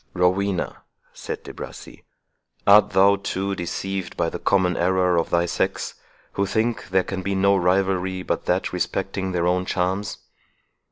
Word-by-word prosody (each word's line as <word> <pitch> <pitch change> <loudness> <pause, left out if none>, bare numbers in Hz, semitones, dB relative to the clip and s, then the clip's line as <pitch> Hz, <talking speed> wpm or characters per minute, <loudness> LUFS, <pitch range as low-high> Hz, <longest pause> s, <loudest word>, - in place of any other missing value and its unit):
"Rowena," 90 +1 0 0.3
said - - -6
De - - -9
Bracy, - - -10 0.6
"art 105 +1 +7
thou, 100 +1 +5
too, 100 0 -2
deceived 95 +1 -4
by - - 0
the - - -5
common 90 -3 +2
error 90 0 +2
of 85 - +1
thy 85 0 +2
sex, 85 - -2 0.4
who 100 - -1
think 110 -1 -1
there 95 0 +3
can 95 0 -4
be 100 +1 -2
no 100 +1 +4
rivalry 95 0 +1
but - - -2
that - - 0
respecting 95 +2 -2
their 85 -1 0
own 90 +1 +2
charms? 95 +2 -1
95 Hz, 155 wpm, -23 LUFS, 90-100 Hz, 0.6 s, art